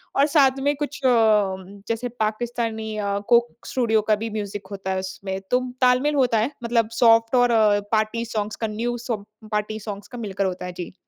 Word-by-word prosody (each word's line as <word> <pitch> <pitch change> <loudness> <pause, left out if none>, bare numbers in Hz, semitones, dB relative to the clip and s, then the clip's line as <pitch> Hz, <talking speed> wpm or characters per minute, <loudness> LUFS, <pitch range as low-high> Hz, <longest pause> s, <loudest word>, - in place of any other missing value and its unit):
और 280 - +5
साथ 275 -3 +4
में 285 +1 +2
कुछ 295 0 -4
अ, - - +6 0.8
जैसे 230 +2 -2
पाकिस्तानी 220 0 -2
अ, 200 -1 -1
कोक 240 0 +5 0.2
स्टूडियो 225 -4 +1
का 215 - +6
भी 225 +2 -4
म्यूज़िक 205 -2 -5
होता 195 -1 -4
है 190 - 0
उसमें। 190 0 -5
तो 250 - +4 0.2
ताल-मेल 255 +4 +3
होता 250 -4 +3
है 240 +7 0
मतलब 230 -1 +1
सॉफ्ट 230 +1 +5
और 245 -1 +4 0.4
पार्टी 220 +2 +1
सॉन्ग्स 215 -1 -3
का, 225 - -2
न्यू 235 +3 -2
सब 230 -4 -4 0.3
पार्टी 210 +1 -2
सॉन्ग्स 205 -1 -7
का 245 - -9
मिलकर 200 -3 -2
होता 180 -1 -3
है। 180 - -5
जी। 175 0 -7
225 Hz, 190 wpm, -23 LUFS, 210-245 Hz, 0.8 s, अ